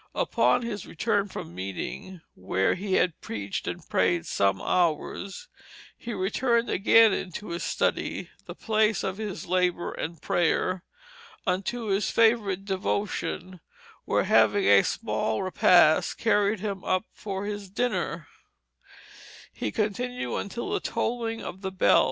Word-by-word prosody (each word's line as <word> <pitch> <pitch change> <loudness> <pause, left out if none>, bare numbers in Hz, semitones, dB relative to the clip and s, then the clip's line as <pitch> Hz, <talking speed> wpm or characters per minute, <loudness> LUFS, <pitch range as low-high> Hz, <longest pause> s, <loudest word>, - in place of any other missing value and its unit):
Upon - - +2
his 210 -5 -5
return 205 +2 0
from 85 - -8
meeting 95 - -6
(where 95 +1 0
he 190 +1 -3
had 175 -3 +1
preached 100 -3 -4
and - - -5
prayed 90 -2 +1
some 95 -1 +1
hours), 180 - -1 0.5
he 235 - -7
returned 235 +4 0
again 225 +2 +6
into 185 +3 -5
his 170 +1 -4
study - - -1 0.2
(the - - -7
place 215 -1 +1
of 190 0 -2
his 205 -7 -5
labor 180 -1 0
and 165 -1 -5
prayer), 175 +2 0 0.6
unto 195 +6 -1
his 195 +1 +1
favorite 215 -4 +2
devotion; 190 -1 -2 0.5
where - - +2
having 400 -1 +4
a - - +7
small - - -1
repast 175 -3 +4
carried 205 -2 +2
him 200 -3 -4
up 185 +3 0
for 200 -1 -5
his 205 -2 -5
dinner, 245 +5 -2 1.3
he - - -3
continued 245 +3 -2
until 235 +4 -4
the - - +1
tolling 230 -1 -2
of 190 - -7
the 190 -1 -3
bell. 190 - +4
195 Hz, 135 wpm, -27 LUFS, 180-220 Hz, 1.3 s, a